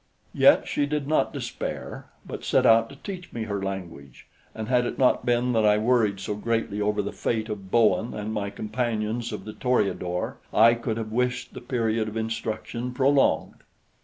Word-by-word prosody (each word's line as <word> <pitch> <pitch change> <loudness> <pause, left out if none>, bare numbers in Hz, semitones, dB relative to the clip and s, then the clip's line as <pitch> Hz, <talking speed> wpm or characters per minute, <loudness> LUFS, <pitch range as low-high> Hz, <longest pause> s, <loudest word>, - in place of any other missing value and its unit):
Yet - - +5
she 145 - 0
did 150 -1 -2
not 155 - +2
despair, - - -5 0.2
but - - -7
set - - +2
out 115 0 +5
to 140 - -11
teach 180 +4 -8
me 115 - -4
her 100 -2 -3
language; 90 -9 -7 0.3
and 110 -1 -5
had 125 0 +3
it - - -5
not 130 -1 +2
been 120 +1 +2
that 110 -1 +2
I 105 0 +5
worried 110 -3 +2
so 95 - -3
greatly 105 -1 -2
over 105 0 +1
the 100 - -4
fate 110 -1 -2
of 100 -3 -6
Bowen 110 0 +2
and 105 +1 -4
my 100 -2 -2
companions 115 +1 -2
of 105 - -6
the 110 - -7
Toreador, 100 -8 -1
I 115 +2 +6
could 115 -1 -3
have 110 -1 -4
wished 125 +1 -1
the - - -8
period 115 -3 -1
of 110 +1 -5
instruction 115 +2 -4
prolonged. 135 +1 +2
115 Hz, 185 wpm, -25 LUFS, 105-125 Hz, 0.3 s, I